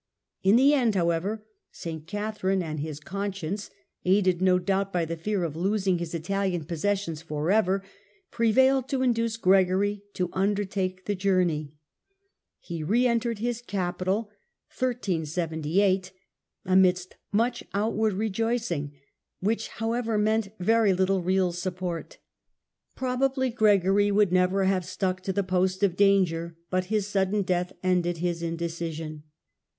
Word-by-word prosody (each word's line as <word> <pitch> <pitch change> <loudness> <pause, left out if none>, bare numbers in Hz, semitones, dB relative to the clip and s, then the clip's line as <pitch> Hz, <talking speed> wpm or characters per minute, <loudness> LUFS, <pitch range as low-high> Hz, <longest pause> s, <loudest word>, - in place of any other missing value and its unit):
In 195 +3 +5
the 275 +4 +6
end, 240 -7 +2
however, 185 +5 0 0.3
St. 160 -2 -7
Catherine 205 -1 -1
and 155 -2 -4
his 150 0 -5
conscience, 200 +2 -4 0.3
aided 185 -1 +2
no 185 -1 +4
doubt 195 +2 0
by 175 -3 0
the 165 +1 -4
fear 190 +3 -2
of 160 -3 -3
losing 190 0 +1
his 170 -1 -4
Italian 180 0 -1
possessions 170 0 -2
for 155 +1 -2
ever, 195 -2 +2 0.5
prevailed 260 +3 +3
to 265 -1 0
induce 230 -2 +1
Gregory 195 0 +3
to 180 -2 -1
undertake 190 -1 -1
the 205 - 0
journey. 180 -6 0 0.8
He 170 -2 -6
re 225 +11 +2
entered 235 -1 +1
his 240 +2 -2
capital 195 0 -2 0.5
Return 240 -9 0
of 175 +4 0 0.5
amidst 185 -1 +3 0.2
much 235 +4 +1
outward 215 +1 0
rejoicing, 215 -7 -1 0.5
which, 220 +3 -1
however, 225 0 -2
meant 215 +1 +2
p°,me^°i378 180 - -6
very 225 -2 +4
little 190 +1 +1
real 185 0 +1
support. 180 -1 -4 0.8
Probably 260 0 0
Gregory 205 -3 +3
would 205 -2 +3
never 185 +2 +3
have 190 -1 +2
stuck 185 +1 -2
to 190 - -2
the 200 +1 0
post 185 +1 0
of 190 -4 +3
danger, 180 -4 +2
but 185 0 +1
his 210 +1 0
sudden 200 0 0
death 180 -1 -1
ended 175 -2 +1
his 170 0 -2
indecision. 165 -2 -4
190 Hz, 135 wpm, -27 LUFS, 175-210 Hz, 0.8 s, the